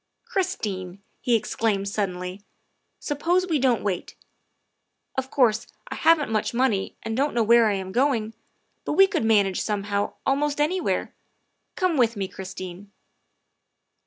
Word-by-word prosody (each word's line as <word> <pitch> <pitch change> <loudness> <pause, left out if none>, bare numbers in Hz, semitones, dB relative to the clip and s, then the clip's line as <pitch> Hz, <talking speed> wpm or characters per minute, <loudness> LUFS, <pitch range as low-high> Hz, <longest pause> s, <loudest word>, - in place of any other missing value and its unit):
' - - -54
' - - -54
" - - -49
Christine," 200 - -2 0.2
he 245 -3 +2
exclaimed 210 -2 0
suddenly, 185 -2 -3 0.3
" - - -49
suppose 345 +5 +1
we 325 -5 0
don't 250 -3 +2
wait. 190 -4 -3 1.0
Of 265 0 -2
course, 230 -5 +2 0.2
I - - -4
haven't 320 -6 +3
much 220 +2 -1
money 235 -6 +1
and 225 0 -3
don't 280 +2 0
know 235 - +3
where 230 +1 +5
I 210 - +2
am 190 -1 -5
going, 235 -3 +1 0.5
but - - -2
we 390 - +7
could 385 - -1
manage 205 -4 +3
somehow 205 -1 -1
almost 290 +2 +1
anywhere. 345 +5 0 0.6
Come 365 -4 +1
with 235 -2 +3
me, 195 -2 -2
Christine." 185 0 -8
225 Hz, 155 wpm, -25 LUFS, 200-285 Hz, 1.0 s, we